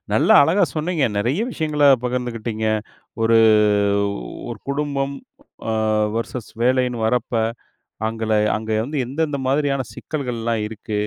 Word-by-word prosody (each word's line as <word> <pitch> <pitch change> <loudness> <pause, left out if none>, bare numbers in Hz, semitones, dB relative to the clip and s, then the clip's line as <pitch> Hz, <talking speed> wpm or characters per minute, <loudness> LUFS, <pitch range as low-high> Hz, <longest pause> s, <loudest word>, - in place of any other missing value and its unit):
நல்லா - - +4
அழகா 170 +8 +3
சொன்னீங்க, 160 -1 0
நெறைய 125 - 0
விஷயங்கள 150 -7 0 0.2
பகிர்ந்துக்கிட்டீங்க. 115 -3 -2 0.6
ஒரு, 115 0 +4 1.1
1 - - -5
குடும்பம் 140 -1 -1 0.6
அ - - 0 0.4
வெர்சஸ் 115 0 -4
வேலைன்னு 125 -2 +1
வரப்ப, 120 +1 0 0.7
அங்கள 110 0 -3 0.2
அங்க 110 0 -5 0.2
வந்து 150 +2 -4
எந்தெந்த 145 +3 -2
மாதிரியான 140 0 +1
சிக்கல்கள்லாம் 115 -6 -3
இருக்கு, 110 -1 -5
125 Hz, 110 wpm, -21 LUFS, 115-145 Hz, 1.1 s, நல்லா